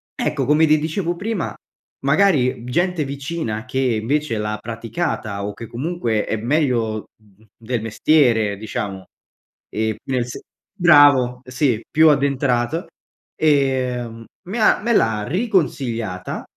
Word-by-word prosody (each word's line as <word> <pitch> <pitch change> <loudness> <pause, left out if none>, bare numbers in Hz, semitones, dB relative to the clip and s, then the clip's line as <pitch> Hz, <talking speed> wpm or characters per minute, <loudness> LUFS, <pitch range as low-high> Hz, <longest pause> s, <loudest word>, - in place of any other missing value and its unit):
ecco, 140 -3 -1
come 150 +4 +4
ti 155 0 +5
dicevo 165 +3 -2
prima, 200 +1 -3 0.5
magari, 140 -6 +3
gente 175 +4 0
vicina, 135 -5 -4
che 130 +1 -3
invece 125 +2 0
l'ha 105 0 -2
praticata, 115 -3 -3
o 105 - -4
che 115 +3 -9
comunque 120 -4 -2
è - - -1
meglio 115 -4 0
mhmm, 105 0 -25
del 115 0 -3
mestiere 115 -3 +2
diciamo, 100 -2 -5 0.6
e 110 0 -1
nel 125 -2 0
sen 125 - -7 0.4
Bravo, 145 - +5
sì, 125 -3 0
più 160 0 +5
addentrato. 140 +1 +1 0.5
Ehm, 130 -6 0 0.2
me 215 +6 -3
ha 215 - +4
me 235 +2 -1
l'ha 110 - +2
riconsigliata 135 - -1
130 Hz, 125 wpm, -20 LUFS, 115-155 Hz, 0.6 s, ti